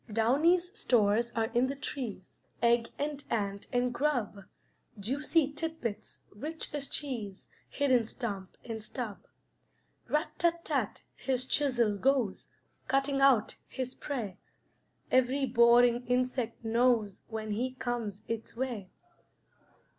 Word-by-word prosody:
Downy's 325 - +3
stores 235 - +3
are 225 -1 0
in 245 +2 +3
the 275 - -3
trees, 245 -9 -5 0.3
Egg 235 0 +3
and 290 -1 -3
ant 200 -3 -2
and 245 0 +1
grub; 240 -8 -1 0.5
Juicy 285 - +1
tidbits, 305 -8 -4
rich 305 +11 -6
as 285 -2 -2
cheese, 225 -9 -4 0.2
Hid 285 -2 0
in 240 -3 +4
stump 200 -7 -5
and 225 -2 -5
stub. 220 -2 -5 0.9
Rat 300 +2 +1
tat 340 -1 +1
tat - - -1
his 255 -1 -1
chisel 245 -7 +2
goes, 260 -6 +1 0.4
Cutting 275 +1 +1
out 265 -6 +4
his 255 -1 -4
prey; 230 -10 -4 0.7
Every 260 +2 +3
boring 240 0 +5
insect 250 -2 0
knows 225 -3 +2
When 220 -1 -4
he 250 +5 -1
comes 235 -5 -3
its 230 0 -4
way. 235 -7 -3
245 Hz, 120 wpm, -31 LUFS, 225-275 Hz, 0.9 s, boring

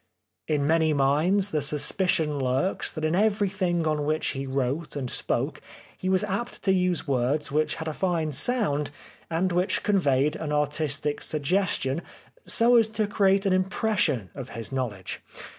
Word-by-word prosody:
In 145 -2 +1
many 160 0 +3
minds 155 +9 +2
the 150 - 0
suspicion 150 +1 +1
lurks 130 +7 0
that 155 -1 -3
in 155 - +1
everything 190 -4 +1
on 155 -1 0
which 155 +2 0
he 135 0 -4
wrote 135 +4 -2
and 135 -3 -3
spoke - - -1 0.3
he 185 - -3
was 190 +1 +3
apt 210 +4 -4
to 195 - +3
use 180 -3 0
words 140 +3 0
which 155 +2 +1
had 160 - -6
a 155 - -2
fine 165 -3 0
sound 150 - 0 0.4
and 175 +3 0
which 180 +2 0
conveyed 150 -8 +2
an 155 -2 -4
artistic 150 0 -1
suggestion 155 -2 0 0.5
so 240 +1 +4
as 225 -2 +4
to 215 0 -1
create 200 -1 +2
an 195 - +3
impression 185 - 0
of 130 -2 -7
his 115 +2 -7
knowledge. 120 -8 -4
155 Hz, 160 wpm, -26 LUFS, 145-190 Hz, 0.5 s, so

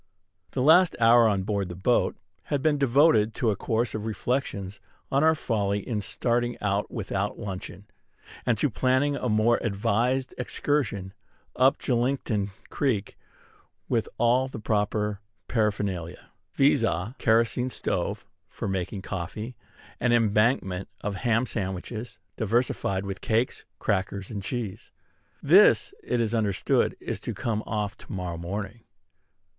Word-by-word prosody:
The 125 - 0
last 170 +4 +6
hour 115 0 +6
on 100 -3 +1
board 100 -2 -1
the 90 - -6
boat 105 +7 +1 0.3
had 145 -2 -1
been 150 -2 +2
devoted 125 -5 +4
to 115 - +1
a - - -1
course 115 +4 -1
of 110 0 -3
reflections 105 -3 -2 0.3
on 140 +2 +3
our 160 0 +5
folly 105 -7 -1
in 110 -4 -1
starting 120 +4 -1
out 100 0 0
without 100 -2 -3
luncheon, 95 0 -6 0.6
and 120 -3 +1
to 140 +4 +1
planning 130 +5 +2
a 125 - -2
more 110 +2 +3
advised 115 +5 0
excursion 115 -8 -1 0.4
up 130 +3 +4
Julington 120 -5 0 0.2
Creek 115 -9 -1 0.7
with - - 0
all 125 +2 +3
the 130 - -7
proper 105 -1 -1 0.3
paraphernalia; 100 -6 -2 0.2
viz., 140 -1 +4
a 95 +4 -1
kerosene 115 +3 +2
stove - - -2 0.2
for - - -5
making 95 0 -3
coffee, 105 +6 -5 0.4
an 125 0 +2
embankment 105 -4 +2
of 105 - -2
ham 115 +4 +1
sandwiches, 110 +2 -4 0.2
diversified 110 -3 0
with 95 -1 -5
cakes, 115 +3 0
crackers, 100 0 -2
and 100 -3 -4
cheese. 110 -1 -5 0.5
This, - - +6
it 125 - -1
is 115 -1 0
understood, 105 -4 +1
is - - -4
to - - -5
come 110 -3 -1
off 105 -2 -2
to - - -12
morrow 90 -3 -4
morning. 100 +5 -5
110 Hz, 135 wpm, -26 LUFS, 100-125 Hz, 0.7 s, last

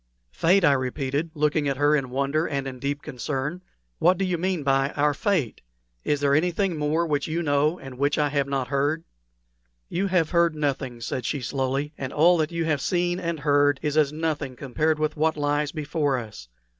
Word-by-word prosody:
"Fate!" 180 - +3
I 145 - +6
repeated, 135 +4 -2
looking 150 0 +1
at 135 - -2
her 145 +2 +4
in 135 -4 -1
wonder 140 +5 0
and 140 -2 -2
in 130 -1 -7
deep 140 +2 -3
concern. 150 +4 -4 0.4
"What 180 +2 +4
do 195 - 0
you 180 -1 0
mean 180 -2 -1
by 135 0 +2
our 145 0 +2
fate? 180 - -1 0.4
Is 145 -1 0
there 140 -1 +3
anything 180 +4 +1
more 155 +3 0
which 145 -3 -1
you 165 +2 -1
know 150 +2 +2
and 135 -4 -10
which 145 +1 +1
I 150 -1 +2
have 140 -1 0
not 135 -2 -2
heard?" 145 +4 0 0.9
"You 190 +3 -1
have 180 -4 +1
heard 170 -2 +3
nothing," 135 -5 -2
said 125 +2 -3
she, 145 - -2
slowly; 135 +3 -2
"and 130 -1 -4
all 175 +4 +5
that 155 0 0
you 170 -1 -1
have 150 -4 0
seen 175 +2 0
and 170 -4 -3
heard 145 -1 +3
is 150 -1 -1
as 150 -2 +3
nothing 155 -4 -3
compared 155 +5 0
with 155 0 -1
what 160 +1 +1
lies 145 0 0
before 150 -3 -1
us. 105 - -8
150 Hz, 200 wpm, -25 LUFS, 140-160 Hz, 0.9 s, I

